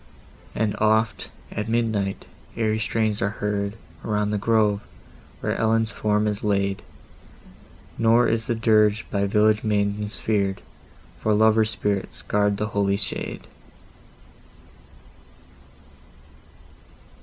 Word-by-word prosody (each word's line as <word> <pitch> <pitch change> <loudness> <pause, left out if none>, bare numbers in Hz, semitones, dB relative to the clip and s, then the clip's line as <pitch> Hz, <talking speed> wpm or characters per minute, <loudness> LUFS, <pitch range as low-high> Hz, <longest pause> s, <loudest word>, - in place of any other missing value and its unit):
And 105 -1 0
oft, 110 +1 +1 0.2
at 105 +1 -4
midnight, 110 -4 -1 0.3
airy 110 -1 +1
strains 110 -1 0
are 100 - +1
heard 100 0 -2 0.3
Around 105 -1 0
the 105 - 0
grove, 105 -1 +2 0.6
where - - -1
Ellen's 115 0 +1
form 105 +1 0
is 105 -1 -2
laid; 100 -2 0 1.2
Nor 115 +1 +4
is 115 0 0
the 120 - 0
dirge 110 -1 +3
by 100 0 +1
village 105 +1 +3
maidens 105 0 -1
fear'd, 100 -3 -1 0.6
For 110 -1 +1
lovers' 110 0 +4
spirits 100 -3 -2
guard 105 -1 +1
the 105 +1 -2
holy 100 -1 +1
shade! 100 - -4
105 Hz, 110 wpm, -24 LUFS, 100-110 Hz, 1.2 s, Nor